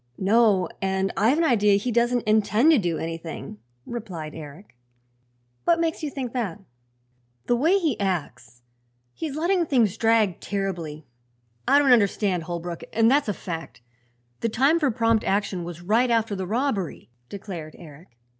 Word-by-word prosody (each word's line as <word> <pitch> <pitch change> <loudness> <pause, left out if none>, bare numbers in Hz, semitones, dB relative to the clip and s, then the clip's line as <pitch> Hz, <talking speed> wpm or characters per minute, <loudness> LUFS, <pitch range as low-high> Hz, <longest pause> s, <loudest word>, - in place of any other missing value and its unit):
"No; 200 -2 +3
and 190 0 -1
I've 230 +9 +3
an 335 - +2
idea 210 -8 +4
he 210 +5 -1
doesn't 240 +1 +1
intend 215 +7 +4
to 305 - +5
do 175 -5 -1
anything," 165 -9 -6 0.3
replied 180 -10 -6
Eric. 155 +2 -11 0.9
"What 335 -1 +3
makes 330 0 -1
you 305 - -2
think 260 -4 -5
that?" 215 -7 -3 0.9
"The 240 - +2
way 320 +11 +3
he 315 - -1
acts. 125 - -4 0.5
He's 310 -4 -5
letting 340 +2 +1
things 225 -8 +2
drag 225 -5 +2
terribly. 170 -7 -4 0.6
I - - +6
don't 280 -3 +5
understand 200 -5 +1
Holbrook, 170 0 -5
and 225 +1 +3
that's 280 -4 +2
a - - +1
fact. 165 - -7 0.6
The 230 - -1
time 275 +9 +3
for 295 -4 +2
prompt 230 -2 +1
action 195 -2 -1
was 170 0 -8
right 225 +7 +2
after 225 -3 +1
the 190 -1 -4
robbery," 215 - -2 0.2
declared 180 -6 -8
Eric. 150 -5 -15
210 Hz, 155 wpm, -24 LUFS, 175-245 Hz, 0.9 s, I